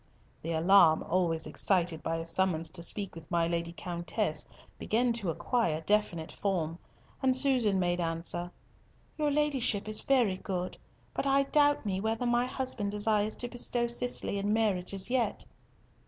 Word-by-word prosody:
The 165 Hz, +1 st, -3 dB
alarm 165 Hz, -1 st, +5 dB
always 165 Hz, -2 st, 0 dB
excited 170 Hz, +1 st, 0 dB
by 165 Hz, -, -2 dB
a 165 Hz, 0 st, -4 dB
summons 165 Hz, -1 st, 0 dB
to 170 Hz, -, -5 dB
speak 195 Hz, +3 st, -2 dB
with 165 Hz, -1 st, -12 dB
my 170 Hz, -1 st, +2 dB
Lady 170 Hz, 0 st, -2 dB
Countess 170 Hz, -1 st, -3 dB, 0.3 s
began 235 Hz, +2 st, +1 dB
to 220 Hz, -6 st, -2 dB
acquire 165 Hz, -3 st, 0 dB
definite 175 Hz, -4 st, 0 dB
form, 170 Hz, -4 st, -2 dB, 0.4 s
and 260 Hz, -1 st, +3 dB
Susan 255 Hz, -7 st, +3 dB
made 175 Hz, -1 st, 0 dB
answer, 170 Hz, +1 st, -1 dB, 0.7 s
"Your 300 Hz, -1 st, +2 dB
Ladyship 275 Hz, -8 st, 0 dB
is 215 Hz, 0 st, 0 dB
very 240 Hz, -9 st, +2 dB
good, 185 Hz, -1 st, -4 dB, 0.3 s
but 275 Hz, -, -2 dB
I 275 Hz, 0 st, +4 dB
doubt 290 Hz, -2 st, +2 dB
me 190 Hz, -2 st, -1 dB
whether 225 Hz, +3 st, -1 dB
my 240 Hz, +1 st, +2 dB
husband 255 Hz, -6 st, -2 dB
desires 210 Hz, +1 st, +1 dB
to 245 Hz, -, -4 dB
bestow 240 Hz, 0 st, 0 dB
Cicely 240 Hz, -3 st, 0 dB
in 205 Hz, +1 st, -1 dB
marriage 210 Hz, -5 st, 0 dB
as 195 Hz, +4 st, -3 dB
yet." 240 Hz, -5 st, 0 dB
200 Hz, 155 wpm, -30 LUFS, 170-240 Hz, 0.7 s, alarm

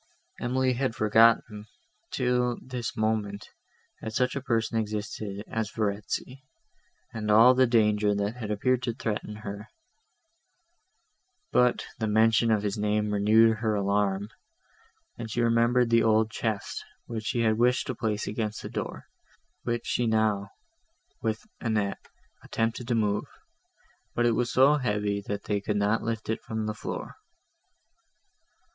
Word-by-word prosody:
Emily 130 Hz, +1 st, +1 dB
had 125 Hz, -1 st, -1 dB
forgotten, 110 Hz, -1 st, +3 dB, 0.4 s
till 125 Hz, -1 st, 0 dB
this 125 Hz, -3 st, -5 dB
moment, 110 Hz, -2 st, -1 dB, 0.5 s
that 110 Hz, -, -5 dB
such 125 Hz, +3 st, +1 dB
a 140 Hz, -, -2 dB
person 115 Hz, -3 st, 0 dB
existed 105 Hz, -1 st, -4 dB
as 110 Hz, -2 st, -2 dB
Verezzi, 105 Hz, +5 st, -3 dB, 0.7 s
and 105 Hz, -2 st, -4 dB
all 115 Hz, +4 st, +7 dB
the 130 Hz, 0 st, +4 dB
danger 105 Hz, -3 st, +3 dB
that 100 Hz, +3 st, -2 dB
had 110 Hz, -4 st, -5 dB
appeared 125 Hz, +4 st, +1 dB
to 120 Hz, -2 st, -2 dB
threaten 105 Hz, -3 st, -3 dB
her; 100 Hz, +2 st, -6 dB, 1.8 s
but 125 Hz, 0 st, +3 dB
the 110 Hz, -, 0 dB
mention 110 Hz, +1 st, +4 dB
of 105 Hz, -2 st, +2 dB
his 105 Hz, 0 st, -2 dB
name 105 Hz, 0 st, 0 dB
renewed 110 Hz, +2 st, +4 dB
her 110 Hz, -1 st, 0 dB
alarm, 100 Hz, 0 st, 0 dB, 0.9 s
and 115 Hz, -1 st, -5 dB
she 115 Hz, -, -3 dB
remembered 120 Hz, +1 st, +3 dB
the 115 Hz, 0 st, +5 dB
old 110 Hz, 0 st, +3 dB
chest, 110 Hz, -2 st, -3 dB, 0.2 s
that 115 Hz, -2 st, -4 dB
she 120 Hz, +2 st, -1 dB
had 110 Hz, -1 st, +2 dB
wished 125 Hz, +1 st, +3 dB
to 130 Hz, -, -3 dB
place 110 Hz, -2 st, -2 dB
against 105 Hz, 0 st, -3 dB
the -, -, -5 dB
door, -, -, -5 dB, 0.6 s
which 120 Hz, 0 st, -2 dB
she 120 Hz, -, 0 dB
now, 110 Hz, -3 st, +1 dB, 0.7 s
with 110 Hz, -1 st, -2 dB
Annette, 105 Hz, -3 st, -2 dB, 0.4 s
attempted 115 Hz, +1 st, -2 dB
to 120 Hz, -, +1 dB
move, 105 Hz, -2 st, +1 dB, 0.9 s
but 120 Hz, -, +2 dB
it 120 Hz, -, +4 dB
was 120 Hz, +1 st, 0 dB
so 140 Hz, +3 st, +5 dB
heavy, 105 Hz, -5 st, -1 dB
that 100 Hz, 0 st, -3 dB
they 105 Hz, -1 st, -1 dB
could 105 Hz, +1 st, -1 dB
not 105 Hz, +2 st, +1 dB
lift 115 Hz, -1 st, -3 dB
it 110 Hz, -, -2 dB
from 110 Hz, -1 st, -4 dB
the 105 Hz, -, -2 dB
floor. 105 Hz, -, -6 dB
110 Hz, 145 wpm, -27 LUFS, 105-120 Hz, 1.8 s, all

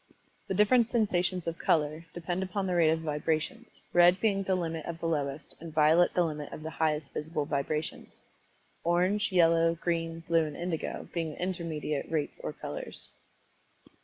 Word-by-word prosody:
The 190 Hz, -, -1 dB
different 225 Hz, +4 st, +4 dB
sensations 185 Hz, -6 st, +1 dB
of 165 Hz, 0 st, -3 dB
color, 155 Hz, +1 st, +1 dB
depend 175 Hz, +1 st, -2 dB
upon 190 Hz, +1 st, -2 dB
the 185 Hz, -, -1 dB
rate 170 Hz, -2 st, +4 dB
of 160 Hz, 0 st, +1 dB
the -, -, -9 dB
vibrations, 160 Hz, -, -2 dB
red 175 Hz, +1 st, +6 dB
being 200 Hz, -3 st, +2 dB
the 190 Hz, -1 st, +1 dB
limit 165 Hz, -3 st, -3 dB
of 170 Hz, -, -4 dB
the -, -, -5 dB
lowest, 145 Hz, -3 st, -2 dB
and 165 Hz, -1 st, -7 dB
violet 155 Hz, +3 st, +4 dB
the 180 Hz, -, +4 dB
limit 150 Hz, -3 st, -4 dB
of 155 Hz, -, -8 dB
the 160 Hz, -, -5 dB
highest 155 Hz, -3 st, -1 dB
visible 150 Hz, -1 st, -2 dB
vibrations 150 Hz, +1 st, -3 dB, 0.6 s
orange, 185 Hz, +5 st, +2 dB
yellow, 165 Hz, -2 st, +4 dB
green, 165 Hz, -1 st, -2 dB
blue, 165 Hz, 0 st, +2 dB
and 150 Hz, -1 st, -6 dB
indigo 170 Hz, -2 st, -3 dB
being 165 Hz, -3 st, -2 dB
the -, -, -15 dB
intermediate 165 Hz, -5 st, -3 dB
rates 155 Hz, -3 st, -2 dB
or -, -, -2 dB
colors. -, -, -6 dB
165 Hz, 170 wpm, -30 LUFS, 155-180 Hz, 0.6 s, red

